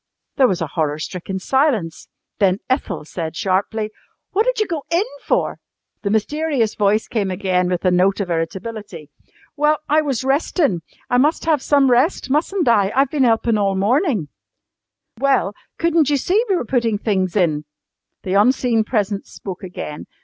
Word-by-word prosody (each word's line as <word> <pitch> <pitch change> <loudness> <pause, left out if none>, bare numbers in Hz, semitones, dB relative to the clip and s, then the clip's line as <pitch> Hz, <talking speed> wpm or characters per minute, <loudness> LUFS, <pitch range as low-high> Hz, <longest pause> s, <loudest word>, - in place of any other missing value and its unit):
There 265 - +6
was 185 -7 -1
a 150 - -7
horror 150 -2 0
stricken 180 +4 -5
silence. 225 - 0 0.3
Then 190 -2 +3
Ethel 200 - -1
said 160 0 -5
sharply: 205 +4 -1 0.4
"What 430 +5 +1
did - - +1
you 430 - +2
go 330 -6 -3
in 340 +5 +2 0.2
for?" - - 0 0.4
The 200 - -2
mysterious 250 +2 0
voice 210 +1 +1
came 205 -4 -1
again 185 -1 0
with 180 0 -2
a 185 - +4
note 185 +3 +3
of 190 -3 -2
irritability. 180 0 -5 0.4
"Well, 300 +1 +3
I 305 +2 +3
was 275 -5 -2
restin'. 270 - +1 0.3
I 245 - +4
mus' 300 +5 +2
have 315 -4 +2
some 275 -2 +3
rest, 260 +3 +2
mustn't 335 +4 +1
I? 205 -4 +4
I've 270 0 +3
been 280 -4 +2
helpin' 225 -1 +2
all 195 -1 +1
mornin'." 220 - +1 0.9
"Well, 265 -7 +2 0.2
couldn't 330 -3 +2
you 290 - +3
see 385 - +2
we 385 - +3
were 340 - -2
putting 230 -3 +1
things 190 -4 -1
in?" 155 -6 +1 0.6
The 185 - -2
unseen 230 +2 +3
presence 205 -3 -2
spoke 190 -1 -8
again. 175 -5 -7
220 Hz, 165 wpm, -20 LUFS, 190-280 Hz, 0.9 s, There